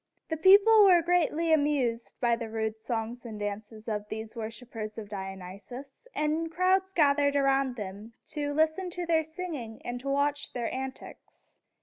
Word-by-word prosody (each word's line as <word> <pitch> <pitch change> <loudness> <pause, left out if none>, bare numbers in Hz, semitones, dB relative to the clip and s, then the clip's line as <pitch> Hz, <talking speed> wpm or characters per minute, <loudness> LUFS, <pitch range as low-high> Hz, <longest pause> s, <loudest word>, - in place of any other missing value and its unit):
The 320 - -1
people 405 +5 +7
were 360 -4 +6
greatly 335 -1 +2
amused 280 -6 +1
by 240 -2 +3
the 230 -1 -6
rude 220 0 -3
songs 230 +1 -4
and 220 -3 -7
dances 210 +2 -6
of 210 -1 -3
these 220 +1 -6
worshipers 225 -1 -6
of 210 -2 -7
Dionysus, 200 - -8
and 315 +2 0
crowds 375 +2 +2
gathered 285 -4 +3
about 275 -2 +2
them 210 +1 -7 0.2
to 290 -1 -2
listen 315 +5 +1
to 355 0 -4
their 330 -1 +3
singing 315 -9 -6
and 245 0 -4
to 275 +2 -5
watch 285 +1 0
their 240 -2 -3
antics. 265 0 -8
265 Hz, 155 wpm, -29 LUFS, 220-315 Hz, 0.2 s, people